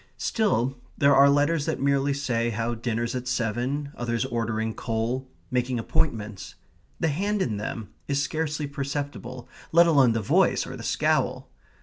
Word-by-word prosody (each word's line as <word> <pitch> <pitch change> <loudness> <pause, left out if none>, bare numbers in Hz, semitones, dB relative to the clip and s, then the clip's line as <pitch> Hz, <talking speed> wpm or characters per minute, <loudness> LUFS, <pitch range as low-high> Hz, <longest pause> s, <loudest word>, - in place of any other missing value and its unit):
Still, 135 - 0 0.2
there 140 0 +5
are 140 +1 +7
letters 145 +2 +2
that 160 - -1
merely 140 0 +2
say 125 -4 0
how 115 +1 -1
dinner's 115 0 -2
at 125 -1 -4
seven; 125 +4 -1
others 115 -1 -1
ordering 110 -1 -1
coal; 120 +4 -2 0.2
making 125 0 0
appointments. 110 -4 -2 0.4
The 165 - +2
hand 200 +8 0
in 115 - 0
them 105 +1 -5 0.2
is 140 -1 +1
scarcely 150 +1 -1
perceptible, 140 -3 -5 0.2
let 170 +1 +7
alone 140 -8 +5
the 115 - 0
voice 100 - +3
or - - -7
the - - -8
scowl. - - 0
130 Hz, 150 wpm, -26 LUFS, 115-145 Hz, 0.4 s, are